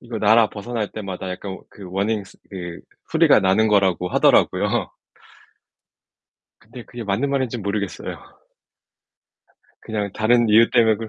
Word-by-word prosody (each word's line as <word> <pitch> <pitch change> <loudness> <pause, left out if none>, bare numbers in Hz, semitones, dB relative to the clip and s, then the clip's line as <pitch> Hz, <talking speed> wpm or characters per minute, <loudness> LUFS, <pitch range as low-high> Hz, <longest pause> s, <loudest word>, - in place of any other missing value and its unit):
이거 120 -2 -6
나라 110 +1 +4
벗어날 110 0 -4
때마다 95 -3 -6
약간 95 +1 -6
워 - - -10
그 105 - -14
워닝 100 +2 -1
스 - - -18
그 85 -3 -7 0.3
소리가 - - +5
나는 95 +4 +2
거라고 95 -3 +2
하더라고요. - - +2 1.7
근데 120 +2 -12
그게 120 -1 -9
맞는 105 +6 -1
말인진 130 -5 -2
모르겠어요. 100 -2 -4 1.6
그냥 105 -2 -4
다른 120 +2 +2
이유 115 +2 +5
때문에 115 -3 +4
그 110 +1 -7
105 Hz, 300 characters per minute, -21 LUFS, 100-115 Hz, 1.7 s, 소리가